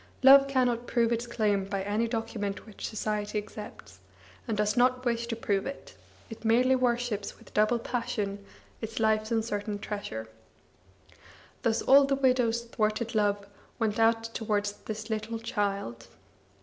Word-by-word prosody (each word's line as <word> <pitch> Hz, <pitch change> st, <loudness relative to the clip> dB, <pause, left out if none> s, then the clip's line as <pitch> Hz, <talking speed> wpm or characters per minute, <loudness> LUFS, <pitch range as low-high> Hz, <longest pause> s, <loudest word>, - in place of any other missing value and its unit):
Love 275 Hz, +1 st, +9 dB
cannot 245 Hz, -3 st, +1 dB
prove 235 Hz, -1 st, +2 dB
its 235 Hz, +1 st, -1 dB
claim 210 Hz, -4 st, +1 dB
by 195 Hz, 0 st, -3 dB
any 210 Hz, +4 st, 0 dB
document 225 Hz, -3 st, -3 dB
which 215 Hz, -3 st, -7 dB
society 210 Hz, -1 st, -2 dB
accepts, 210 Hz, -, -8 dB, 0.5 s
and 220 Hz, -3 st, -1 dB
does 210 Hz, 0 st, +1 dB
not 255 Hz, +1 st, +3 dB
wish 235 Hz, -1 st, 0 dB
to 235 Hz, -, -2 dB
prove 200 Hz, -2 st, -1 dB
it; 275 Hz, -, -8 dB, 0.3 s
it 225 Hz, -1 st, -10 dB
merely 245 Hz, +4 st, +4 dB
worships 240 Hz, -5 st, -1 dB
with -, -, -18 dB
double 215 Hz, +3 st, +3 dB
passion 210 Hz, -4 st, -3 dB, 0.4 s
its 225 Hz, 0 st, -4 dB
life's 220 Hz, 0 st, +2 dB
uncertain 215 Hz, -2 st, -1 dB
treasure. 200 Hz, -, -5 dB, 1.3 s
Thus 225 Hz, -1 st, +1 dB
all 275 Hz, +1 st, +7 dB
the 275 Hz, 0 st, +1 dB
widow's 250 Hz, -3 st, +2 dB
thwarted 230 Hz, 0 st, -1 dB
love 205 Hz, -2 st, +1 dB, 0.3 s
went 220 Hz, -2 st, 0 dB
out 225 Hz, 0 st, +4 dB
to 230 Hz, 0 st, -5 dB
wards 205 Hz, -1 st, 0 dB, 0.2 s
this 220 Hz, +1 st, -5 dB
little 220 Hz, +1 st, -2 dB
child. 200 Hz, -, -3 dB
225 Hz, 150 wpm, -29 LUFS, 205-235 Hz, 1.3 s, Love